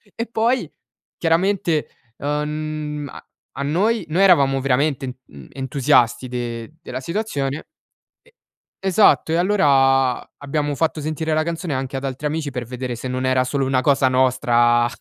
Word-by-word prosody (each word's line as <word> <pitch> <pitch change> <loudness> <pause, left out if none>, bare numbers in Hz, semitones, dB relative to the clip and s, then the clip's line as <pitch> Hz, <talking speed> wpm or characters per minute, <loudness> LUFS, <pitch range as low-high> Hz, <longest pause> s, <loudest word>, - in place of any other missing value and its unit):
E 230 +1 -3
poi, 235 +3 0 0.5
chiaramente, 170 -1 +1 0.3
ehm, 150 0 -3 0.4
a 140 - -4
noi 195 +10 +1
noi 170 +5 +1
eravamo 140 -8 +5
veramente, 135 -1 0
mhmm, 70 -3 -13
entusiasti 130 -2 +2
de 120 +1 -5
della 130 -5 -6
situazione 150 -4 -3 0.6
e, 485 - -26 0.5
esatto. 190 -3 +3
E - - +3
allora 135 -9 +3 0.2
abbiamo 145 +1 -2
fatto 160 +1 -1
sentire 155 +1 -2
la 155 0 +2
canzone 165 -1 -3
anche 135 +1 -3
ad 135 - -4
altri 135 +2 -3
amici 150 -1 -2
per 125 -2 -4
vedere 125 +1 -5
se 120 - -6
non 130 +1 -2
era 130 0 +2
solo 135 +1 -1
una 130 -1 +1
cosa 135 -1 +3
nostra 120 -2 +3
140 Hz, 145 wpm, -21 LUFS, 130-160 Hz, 0.6 s, eravamo